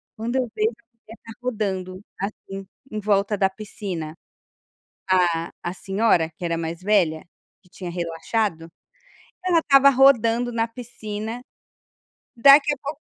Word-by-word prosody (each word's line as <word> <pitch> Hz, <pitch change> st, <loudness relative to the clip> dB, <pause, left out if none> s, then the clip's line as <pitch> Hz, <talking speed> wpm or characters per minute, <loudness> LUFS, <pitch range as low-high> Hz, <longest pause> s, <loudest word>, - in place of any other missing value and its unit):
Quando 235 Hz, +3 st, -2 dB
eu 255 Hz, -2 st, 0 dB
vejo 215 Hz, +2 st, +1 dB
a 225 Hz, -, -22 dB, 0.2 s
mulher 225 Hz, +1 st, -13 dB
tá 225 Hz, -, -10 dB
rodando, 190 Hz, -6 st, -3 dB, 0.2 s
assim, 195 Hz, -1 st, -6 dB, 0.2 s
em 215 Hz, -, -3 dB
volta 205 Hz, 0 st, +1 dB
da 195 Hz, -, +3 dB
piscina 190 Hz, -5 st, -6 dB, 0.9 s
a 175 Hz, -3 st, +2 dB
a 175 Hz, -, -3 dB
senhora 195 Hz, -3 st, +1 dB
que -, -, -11 dB
era 170 Hz, -1 st, -1 dB
mais 165 Hz, +1 st, -4 dB
velha, 185 Hz, -6 st, +2 dB, 0.4 s
que 180 Hz, -, -26 dB
tinha 180 Hz, -1 st, -7 dB
relaxado, 170 Hz, +1 st, -2 dB, 0.8 s
ela 350 Hz, -2 st, +4 dB
estava 280 Hz, -3 st, +6 dB
rodando 245 Hz, -3 st, +4 dB
na 230 Hz, -1 st, 0 dB
piscina 225 Hz, -1 st, -6 dB, 1.0 s
daqui 280 Hz, +4 st, +7 dB
a -, -, -15 dB
pouco 285 Hz, +2 st, -6 dB
210 Hz, 135 wpm, -23 LUFS, 180-235 Hz, 1.0 s, daqui